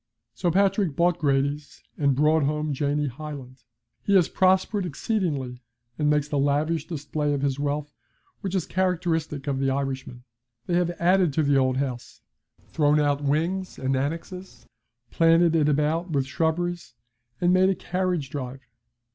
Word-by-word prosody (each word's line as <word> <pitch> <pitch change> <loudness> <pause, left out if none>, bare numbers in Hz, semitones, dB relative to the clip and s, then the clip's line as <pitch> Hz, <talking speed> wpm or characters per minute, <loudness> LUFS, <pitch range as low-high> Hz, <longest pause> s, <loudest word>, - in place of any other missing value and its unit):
So 175 - -1
Patrick 195 -2 +2
bought 175 +1 +2
Grady's 145 0 -1
and 140 -3 +1
brought 155 +3 +3
home 150 +1 -1
Janie 145 +2 0
Hyland. 135 -2 -8 0.4
He 200 - +1
has 180 -4 +4
prospered 190 +2 +2
exceedingly, 145 - -2 0.4
and 150 -1 +2
makes 150 -1 +2
the 145 -1 -1
lavish 150 +3 0
display 150 -2 -2
of 140 - -3
his 140 -1 0
wealth 145 +1 -2 0.5
which 195 -2 -4
is 185 - 0
characteristic 165 -6 -1
of 140 -2 -1
the 135 0 +1
Irishman. 130 -2 -3 0.4
They 175 - -3
have 175 0 +2
added 180 -2 +3
to 155 - +1
the 140 -1 +3
old 130 -1 +2
house, 130 -3 -4 0.4
thrown 150 -1 +2
out 145 -1 +1
wings 165 +7 -1
and 130 0 -1
annexe, 165 +7 -5 0.5
planted 165 0 +4
it 150 -2 +3
about 150 +4 0
with 140 -4 0
shrubberies, 165 0 -2 0.4
and 175 0 +3
made 185 +1 +4
a 195 - +1
carriage 180 -8 -2
drive. 135 -1 -5
150 Hz, 155 wpm, -25 LUFS, 140-175 Hz, 0.5 s, has